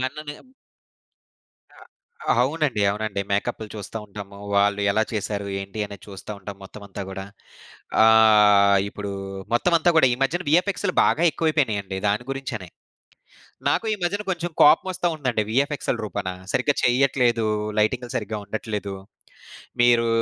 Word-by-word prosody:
నన్ననే 145 +3 -4 1.4
ఆ! - - -19 0.6
అవునండి. 140 -5 0
అవునండి. 105 0 -3
మేకప్‌లు 100 +2 -1
చూస్తా 105 +1 -6
ఉంటాము. 100 -1 -10 0.2
వాళ్ళు 100 0 +3
ఎలా 110 +2 +2
చేసారు, 105 -1 -3
ఏంటి 95 +2 -6
అనేది 100 -1 -11
చూస్తా 100 +1 -10
ఉంటాం 100 0 -8
మొత్తం 100 +2 -11
అంతా 100 0 -7
గూడా. 95 0 -6 0.8
ఆహ్, 105 -3 +6
ఇప్పుడు 100 -1 -6 0.4
మొత్తం 125 +9 +2
అంతా 175 +2 +3
కూడా 160 - +6
ఈ - - +2
మధ్యన 175 +7 0
విఎఫ్ఎక్స్‌లు 185 +3 +1
బాగా 160 - +2
ఎక్కువైపోయినాయండి. 110 - -1
దాని 105 +4 0
గురించనే. 130 -8 -5 1.0
నాకు - - 0
ఈ - - -1
మధ్యన 205 +4 -1
కొంచెం 175 -1 -3
కోపమోస్త 170 +5 +4
వుందండి 130 -8 -1
వీఎఫ్ఎక్సెల 140 +4 0
రూపానా, 100 -3 -4 0.2
సరిగ్గా 145 - +2
చెయ్యట్లేదు, 125 -2 +2 0.3
లైటింగ్‌లు 120 +3 0
సరిగ్గా 105 0 -4
ఉండట్లేదు. 105 -1 -4 0.9
మీరు 120 -1 +4
110 Hz, 130 wpm, -23 LUFS, 100-140 Hz, 1.4 s, ఆహ్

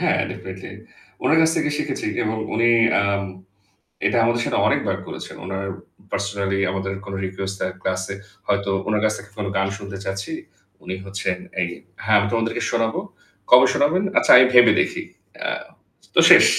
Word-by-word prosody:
হ্যাঁ, - - +2
ডেফিনিটলি। 95 0 -8 0.5
উনার 160 - +4
কাছ 160 0 +4
থেকে - - +1
শিখেছি। 135 - -3
যেমন 110 0 -1 0.2
উনি 115 +1 +3 0.3
আম 100 0 0 0.8
এটা - - +1
আমাদের 120 +1 +1
সাথে - - -1
অনেকবার - - 0
করেছেন। - - -8
উনার 95 +1 -4 0.5
পার্সোনালি 100 0 -1
আমাদের 95 0 -3
কোনো 100 - -6
রিকোয়েস্ট 95 +1 -4
তার 95 - -2
ক্লাসে 95 +1 -2 0.3
হয়তো 100 0 0 0.2
উনার 105 -1 +1
কাছ 110 0 +2
থেকে 105 - -12
কোনো 105 -2 -3
গান 95 0 +1
শুনতে 100 -1 -8
চাচ্ছি, 95 0 -4 0.5
উনি 95 - -4
হচ্ছেন 95 -1 -2 0.2
এই 90 - +1 0.4
"হ্যাঁ, 110 -1 +4
আমি 100 - 0
তোমাদেরকে 115 -1 -1
শোনাব। 115 -1 0 0.6
কবে 125 +1 +8
শোনাবেন? 165 +7 +2
আচ্ছা, - - +4
আগে 125 +1 +9
ভেবে 125 -1 +8
দেখি।" - - -2 0.4
আ - - +1 0.7
তো - - +6
শেষ। - - +9
100 Hz, 165 wpm, -22 LUFS, 95-115 Hz, 0.8 s, আগে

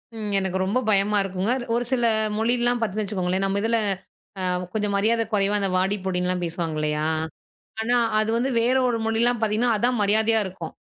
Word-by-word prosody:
ம். 210 -2 -3
எனக்கு 190 -1 -2
ரொம்ப 220 +7 0
பயமா 205 +1 +3
இருக்கும்ங்க. 195 +5 -1 0.2
ஒரு 240 - 0
சில 240 -2 +1 0.3
மொழியல்லாம் 240 +1 +1
பார்த்தீங்கன்னு 215 0 -1
வச்சுக்கோங்களேன், 190 -1 -1
நம்ப 200 +1 0
இதுல 230 0 +2 0.6
அ - - -3 0.3
கொஞ்சம் 210 -2 -1
மரியாதை 225 +3 +2
கொறைவா 200 0 +2
அந்த 195 -1 0
வாடி, 190 +2 +1
போடின்னுலாம் 180 -1 -1
பேசுவாங்க 165 -2 -3
இல்லையா? 150 0 -1 0.8
ஆனா 245 +2 +2 0.2
அது 215 +1 0
வந்து 260 +3 0
வேற 250 +3 +2
ஒரு 235 -2 0
மொழியில்லாம் 230 +1 +1
பார்த்தீங்கன்னா, 220 +2 +1
அதான் 245 +1 +1
மரியாதையா 220 +2 +3
இருக்கும். 180 -3 -7
210 Hz, 170 wpm, -23 LUFS, 190-230 Hz, 0.8 s, பயமா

